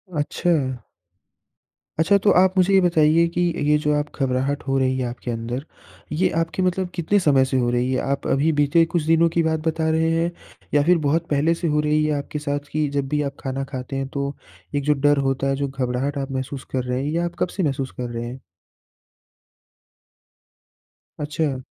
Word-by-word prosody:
अच्छा। 145 -4 0 1.2
अच्छा, 180 +5 +4
तो 205 +1 +3
आप 190 +1 +3
मुझे 185 +1 +4
ये 195 - +7
बताइए 165 -2 +4
कि - - +1 0.3
ये 150 0 +5
जो 150 - +2
आप 145 0 -4
घबराहट 135 +2 0
हो 135 0 +1
रही 130 0 +1
है 130 - -1
आपके 120 0 -5
अंदर, 120 +4 -4 0.5
ये 180 +5 +2
आपके 165 +3 -2
मतलब 185 0 0
कितने 175 +5 +2
समय 140 -7 +4
से 130 0 -1
हो 120 -1 +1
रही 125 +1 0
है? 130 - +1
आप 140 0 -2
अभी 145 +4 +2
बीते 145 +3 +4
कुछ 165 -1 -1
दिनों 165 +1 +4
की 165 0 +1
बात 160 0 0
बता 160 0 0
रहे 160 +1 +2
हैं 165 +1 +1 0.4
या 145 -1 +4
फिर 175 +3 +4
बहुत 165 +3 +1
पहले 150 +3 +2
से 170 0 -3
हो 150 -1 +1
रही 150 0 +2
है 150 -1 0
आपके 145 +1 -5
साथ, 145 -1 -2
कि 155 0 0
जब 140 -1 -2
भी 150 +1 0
आप 140 -1 -3
खाना 135 0 -2
खाते 130 0 -5
हैं, 135 0 -2
तो 140 +1 -3 0.4
एक 145 - 0
जो 150 +1 +3
डर 145 0 +4
होता 135 0 -1
है, 135 - +1
जो 140 +1 -1
घबराहट 135 +1 -2
आप 135 0 -3
महसूस 130 0 -4
कर 130 -1 -1
रहे 125 +1 -2
हैं, 145 - -2
ये 165 - -1
आप 175 0 -2
कब - - +2
से 190 - +1
महसूस 135 -3 -1
कर 125 -1 -4
रहे 120 0 -4
हैं? 125 +2 -7 2.8
अच्छा। 150 -2 -2
145 Hz, 205 wpm, -22 LUFS, 135-165 Hz, 2.8 s, ये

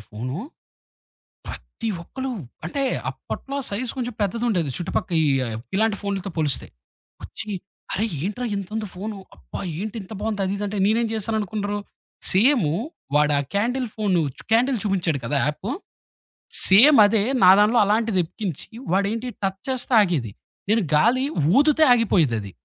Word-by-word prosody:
Phone. 125 +6 -5 1.1
ప్రతి 230 - -7 0.2
ఒక్కళు, 260 +6 -5 0.3
అంటే 275 +12 -2 0.3
అప్పట్లో 275 +1 -6
సైజ్ 230 +4 -2
కొంచం 245 -2 -3
పెద్దదుండేది, 205 - 0
చుట్టుపక్క 180 +1 -2
ఈ - - +2 0.5
ఇలాంటి 215 0 +2
ఫోనులతో 200 -1 -3
పోలిస్తే. 150 -5 0 0.6
వచ్చి 215 - -7 0.4
"అరేయ్, 215 0 -1
ఏంట్రా 245 +5 -3
ఇంతుంది 210 +2 -4
ఫోను? 205 +2 -5 0.2
అబ్బా! - - -8 0.2
ఏంటి 215 +2 -5
ఇంత 195 +3 -10
బాగుంది." 215 -2 -2
అది 190 - -1
ఇదంటే 205 0 -3
నేనేం 225 +2 +2
చేశాననుకున్నరు? 210 -1 -2 0.5
సేము, 205 - +3 0.4
వాడు 150 0 +4
ఆ - - +1
క్యాండిల్ 245 +4 0
ఫోను 200 -5 +1 0.2
చ్ - - -10
క్యాండిల్ 245 +2 +3
చూపించాడు 180 -7 0
కదా 140 +4 0
యాపు? 150 +8 -3 1.0
సేమ్ 235 +9 +8
అదే, 205 0 +2 0.2
నా 185 - +9
దాంట్లో 215 +3 +4
అలాంటిదెక్కించి, 200 - -1 0.2
వాడేంటి 210 +5 0 0.2
టచ్ 195 0 -2
చేస్తే 255 -1 -1
ఆగేది. 155 - 0 0.4
నేను 225 -1 +3
గాలి 240 - +4 0.3
ఊదుతే 305 +2 +5
ఆగిపోయిదది. 150 - +2
205 Hz, 130 wpm, -23 LUFS, 185-230 Hz, 1.1 s, నా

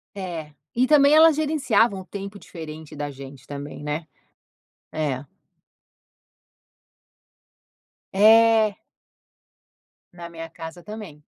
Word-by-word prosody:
É. 170 -6 -6 0.2
E 250 +2 +3
também 290 0 +6
elas 320 -1 +7
gerenciavam 265 -10 +2
o 185 - -10
tempo 200 +1 -8
diferente 155 -4 -10
da 145 0 -4
gente 135 -1 -11
também, 145 +1 -7
né. 150 +2 -3 0.9
É. 145 -3 -2 2.9
É. 220 +1 +5 1.4
Na 170 -1 -9
minha 165 -1 -8
casa 165 +2 -9
também. 210 -9 -9
180 Hz, 95 wpm, -24 LUFS, 155-225 Hz, 2.9 s, elas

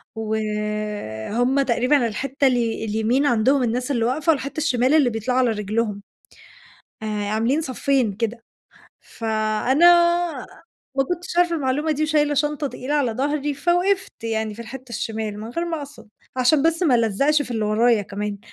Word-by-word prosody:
وهمّ 215 - -2
تقريبًا 250 0 +2
الحتّة 275 +5 0
الي 235 -3 0
اليمين 220 +6 +1
عندهم 255 +2 +3
الناس 250 +4 -1
اللي 230 -3 +1
واقفة 305 +6 +2
والحتّة 280 -1 -3
الشِمال 260 -3 +2
اللي 290 -6 +4
بيطلعوا 240 +3 -1
على 250 -2 +3
رجلهم، 210 0 -2 1.0
آآ، - - -4
عاملين 215 +7 0
صفّين 260 -4 0
كده. 230 +2 -3 0.6
فأنا 220 +7 +1 1.1
ما 270 - +4
كنتش 355 +3 -4
عارفة 345 -1 +3
المعلومة 295 +3 0
دي 305 +1 -2
وشايلة 300 -1 +2
شنطة 295 +1 0
تقيلة 270 +2 -4
على 270 -6 +1
ضهري 290 +3 -1
فوقفت 355 +6 +1
يعني 220 -1 -2
في 235 - -8
الحتّة 255 +2 -10
الشِمال 220 -2 -4
من 220 - -7
غير 335 +8 -2
ما 330 -2 -3
أقصد، 285 -6 -10 0.3
عشان 260 +3 +3
بس 330 +2 +1
ما 275 - +4
ألزّقش 245 +7 +2
في 275 - -8
اللي 220 -2 -1
ورايا 220 0 +3
كمان، 205 +1 -5
245 Hz, 150 wpm, -22 LUFS, 220-290 Hz, 1.1 s, اللي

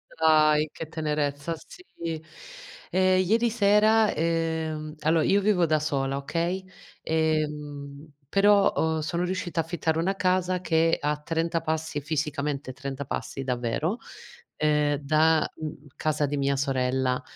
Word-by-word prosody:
Dai 155 -1 +4
che 165 - -7
tenerezza 150 -1 -2
sì. 365 - -15 1.1
Ehm, 185 0 +3
ieri 230 +5 +2
sera, 215 0 +4
ehm 160 -1 -2
allo 160 +1 +2
io 200 +5 +3
vivo 195 -4 +3
da 155 -1 +2
sola, 135 -3 -1
okay, 170 +6 -2 0.4
ehm, 150 -2 -2 0.2
però 200 0 +5
ho 160 0 0
sono 170 +3 -2
riuscita 180 -2 -3
affittare 160 0 -1
una 190 +4 0
casa 185 -1 +1
che 165 -1 +2
a 150 0 0
30 165 +2 -1
passi, 160 -1 -2
fisicamente 145 -2 -2
30 140 +1 -5
passi, 135 0 -4
davvero, 125 - -1 0.6
ehm, 150 -1 +2
da, 155 +2 +3
mhmm, 150 -2 -7
casa 155 -1 0
di 145 +1 -2
mia 140 0 +1
sorella, 130 -1 0
155 Hz, 130 wpm, -26 LUFS, 145-170 Hz, 1.1 s, però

